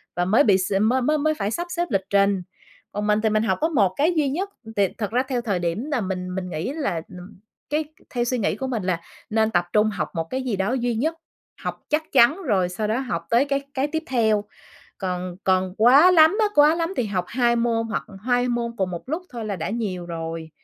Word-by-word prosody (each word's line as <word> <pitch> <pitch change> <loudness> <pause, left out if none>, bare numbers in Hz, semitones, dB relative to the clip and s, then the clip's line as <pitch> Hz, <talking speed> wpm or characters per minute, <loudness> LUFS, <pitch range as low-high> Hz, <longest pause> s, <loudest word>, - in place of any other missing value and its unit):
và 175 +1 +1
mới 215 +10 +4
bị 200 -6 +5
s 190 +1 -2
mới 245 +5 +3
mới 305 +4 +2
mới 310 +1 +1
phải 200 -6 -2
sắp 345 +9 -3
xếp 345 0 -1
lịch 195 -2 0
trình. 200 -1 +3 0.5
Còn 210 0 -2
mình 210 0 +3
thì 220 - +2
mình 215 0 +2
học 225 - +1
có 320 - +2
một 205 - +2
cái 315 +5 +3
duy 300 -3 +2
nhất, 365 +9 -2 0.3
thì 200 -1 +4
thật 210 -3 -3
ra 250 +3 +2
theo 255 -3 -1
thời 205 -6 -1
điểm 175 +8 -2
là 270 -5 +1
mình 185 -2 -4
mình 185 -1 -4
nghĩ 160 +8 -3
là, 275 - -2
ừm, 180 +3 -12 0.3
cái 305 +1 0 0.2
theo 240 -1 -1
suy 250 +1 -1
nghĩ 215 - 0
của 265 - -4
mình 235 -6 -2
là 180 -2 -1 0.3
nên 220 0 +2
tập 175 -2 +2
trung 215 0 +4
học 210 - -3
một 165 - 0
cái 260 - -2
gì 245 -5 -1
đó 195 +3 0
duy 245 -2 0
nhất, 315 +9 0 0.5
học - - -5
chắc 310 +1 -1
chắn 275 +8 +5
rồi 195 - +1
sau 210 +4 -3
đó 220 +4 0
học 210 -11 -3
tới 240 +4 +4
cái 280 -1 0
cái 275 0 0
tiếp 320 +2 -3
theo. 220 -6 +2 0.6
Còn 180 -2 -3
còn 185 -1 +1
quá 270 +10 +7
lắm 320 +2 +6
á, 430 - +4
quá 295 +2 +6
lắm 335 +1 -1
thì 245 - 0
học 185 -3 -1
2 240 -1 +2
môn 230 -1 +1
hoặc 220 - -2 0.2
2 245 0 +2
môn 235 -1 -1
cùng 190 -3 -1
một 175 +6 -7
lúc 320 +6 -2
thôi 235 -2 -5
là 205 -2 -3
đã 165 - -3
nhiều 200 -6 -3
rồi. 165 -1 -5
225 Hz, 245 wpm, -23 LUFS, 190-265 Hz, 0.6 s, quá